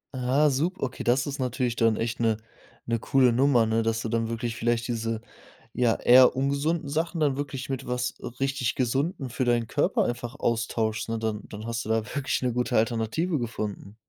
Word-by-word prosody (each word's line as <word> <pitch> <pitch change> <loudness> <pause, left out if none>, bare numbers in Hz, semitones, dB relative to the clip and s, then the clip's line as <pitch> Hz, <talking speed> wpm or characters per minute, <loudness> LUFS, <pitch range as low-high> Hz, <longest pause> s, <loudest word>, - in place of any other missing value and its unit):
Ah, 130 +4 +2
sup 160 +8 0
okay, 130 -1 -3
das 125 +2 +3
ist 140 0 -5
natürlich 125 -1 -1
dann 115 -1 +3
echt 115 +2 -2
'ne 115 -2 +2 0.5
'ne 115 -1 0
coole 130 +1 +3
Nummer, 125 -1 +4
ne, 110 +1 +1
dass 115 0 0
du 115 - -3
dann 115 0 0
wirklich 115 0 -3
vielleicht 120 0 0
diese, 115 -1 -2 0.5
ja, 120 -2 +2
eher 125 +1 +6
ungesunden 140 +4 0
Sachen 165 +3 -1
dann 140 -3 +2
wirklich 140 -2 -4
mit 135 -1 -4
was 125 0 -2 0.3
richtig 135 -3 0
Gesundem 135 +3 -1
für 130 +2 -2
deinen 120 -2 +1
Körper - - +1
einfach 120 +1 -3
austauschst, 110 -3 -1
ne? 115 0 -2
Dann 110 -1 -2
dann 105 +1 -8
hast 115 0 -3
du - - -6
da 110 0 +2
wirklich 140 -3 -1
'ne 125 -1 0
gute 125 +1 -1
Alternative 115 +9 0
gefunden. 105 -3 -5
120 Hz, 190 wpm, -26 LUFS, 115-135 Hz, 0.5 s, eher